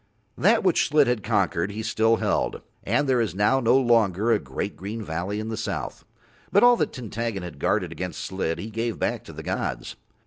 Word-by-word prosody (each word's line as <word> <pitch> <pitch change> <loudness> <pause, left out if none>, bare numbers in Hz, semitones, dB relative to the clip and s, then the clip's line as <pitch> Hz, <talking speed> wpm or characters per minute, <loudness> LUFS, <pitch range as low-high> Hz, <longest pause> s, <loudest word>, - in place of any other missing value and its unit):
That 220 +5 +3
which 185 -3 +3
Slid 150 -1 +4
had 125 -3 0
conquered 100 -4 0
he 105 +2 -5
still 110 0 +2
held, - - -1 0.2
and 120 +8 +1
there 130 -2 +3
is 110 -5 -2
now 105 +7 +3
no 120 +1 +4
longer 115 -4 +3
a 110 - +3
great 65 -1 -5
green 105 +5 -6
valley 90 +4 -3
in 110 +1 -4
the 110 - -3
south, 105 -7 -4 0.5
but 200 - +5
all 245 0 +7
that - - 0
Tintaggon 115 -4 -4
had 90 - -8
guarded - - 0
against - - -5
Slid 95 -4 -2
he 110 - -6
gave 115 +1 -2
back - - -2
to - - -10
the - - -9
gods. - - -3
110 Hz, 205 wpm, -25 LUFS, 100-120 Hz, 0.5 s, all